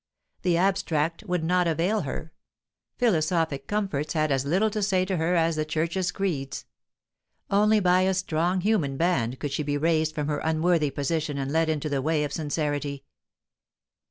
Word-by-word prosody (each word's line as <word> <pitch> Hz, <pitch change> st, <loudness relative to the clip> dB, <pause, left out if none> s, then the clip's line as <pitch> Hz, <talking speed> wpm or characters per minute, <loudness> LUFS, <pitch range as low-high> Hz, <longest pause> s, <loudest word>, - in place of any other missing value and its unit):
The 175 Hz, -2 st, +2 dB
abstract 175 Hz, -2 st, 0 dB
would 180 Hz, -4 st, -1 dB
not 180 Hz, +1 st, +2 dB
avail 175 Hz, +6 st, +1 dB
her; 155 Hz, +2 st, -6 dB, 0.6 s
philosophic 160 Hz, -, +1 dB
comforts 195 Hz, -9 st, -2 dB
had 155 Hz, -2 st, +1 dB
as 135 Hz, 0 st, +1 dB
little 190 Hz, +9 st, +2 dB
to 215 Hz, 0 st, -2 dB
say 190 Hz, -2 st, +2 dB
to 185 Hz, -1 st, -1 dB
her 165 Hz, +2 st, +1 dB
as 165 Hz, -1 st, +2 dB
the 155 Hz, -, +1 dB
Churches' 165 Hz, +4 st, -1 dB
creeds. 165 Hz, -9 st, -3 dB, 0.9 s
Only 210 Hz, +2 st, +4 dB
by 180 Hz, -1 st, +3 dB
a 190 Hz, 0 st, +2 dB
strong 180 Hz, 0 st, 0 dB
human 175 Hz, -10 st, +1 dB
band 135 Hz, -8 st, +1 dB
could 145 Hz, -, -3 dB
she 140 Hz, -, -1 dB
be 145 Hz, 0 st, -1 dB
raised 155 Hz, 0 st, +1 dB
from 150 Hz, -, -1 dB
her 145 Hz, 0 st, -1 dB
unworthy 160 Hz, -1 st, +1 dB
position 145 Hz, +1 st, -2 dB
and 135 Hz, 0 st, -3 dB
led 160 Hz, +1 st, +2 dB
into 155 Hz, -1 st, -1 dB
the 140 Hz, -2 st, -1 dB
way 155 Hz, +1 st, +1 dB
of 145 Hz, -1 st, -4 dB
sincerity. 145 Hz, -2 st, -2 dB
160 Hz, 170 wpm, -26 LUFS, 150-185 Hz, 0.9 s, Only